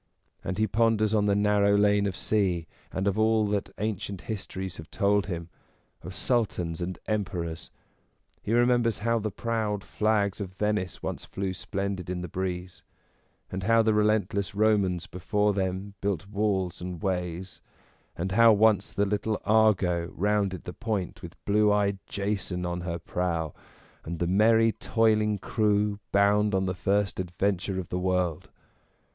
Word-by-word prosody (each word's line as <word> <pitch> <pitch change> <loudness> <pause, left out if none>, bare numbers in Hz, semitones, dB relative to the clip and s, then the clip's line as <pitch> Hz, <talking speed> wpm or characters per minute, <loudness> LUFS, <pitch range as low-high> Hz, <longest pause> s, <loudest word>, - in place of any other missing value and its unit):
And 90 - -3
he 110 - +3
ponders 110 0 +2
on 105 -1 +3
the 100 - +3
narrow 100 0 +3
lane 105 0 +3
of 95 - -3
sea, 95 -6 0 0.3
and 95 +1 -2
of 100 +2 +1
all 110 0 +3
that 100 -1 -1
ancient 100 -2 -3
histories 95 -4 -5
have 80 - -10
told 100 -1 +1
him; 85 -3 -4 0.5
of 95 - -8
Sultans 90 -9 0
and 90 0 -3
Emperors; 90 -6 -3 0.7
he - - -4
remembers 120 -2 +3
how 115 0 +2
the 110 0 -2
proud 110 -2 -2
flags 105 -2 0
of 95 -2 -5
Venice 105 -3 -1
once - - -4
flew 95 -1 -3
splendid 95 -1 -4
in 90 -1 -3
the 90 - -4
breeze, 90 -1 -4 0.7
and 95 - -3
how 115 +3 +4
the 110 -1 +3
relentless 105 -2 +1
Romans 100 -5 +2
before 105 +4 0
them 95 +1 -2
built 95 -2 -1
walls 100 -4 -1
and 90 -2 -6
ways, 90 -1 -3 0.6
and 95 +3 -2
how 115 +3 +7
once 110 0 +3
the 100 - +1
little 105 +2 -1
Argo 100 -6 +3
rounded 100 -2 0
the 90 - -7
point 105 -5 -3
with 85 +1 -9
blue 105 +1 +4
eyed 100 -1 +1
Jason 100 -3 -2
on 90 0 -3
her 85 -1 -3
prow, 85 -3 -2 0.5
and 85 +1 -5
the 85 - 0
merry, 110 +5 +4
toiling 110 -2 +2
crew, 105 +1 +1
bound 105 0 +3
on 95 0 +1
the 95 - -1
first 100 +2 0
adven 95 +1 0
ture 95 0 -3
of 90 - -6
the 90 - -2
world. 90 -3 -1
100 Hz, 160 wpm, -27 LUFS, 90-105 Hz, 0.7 s, how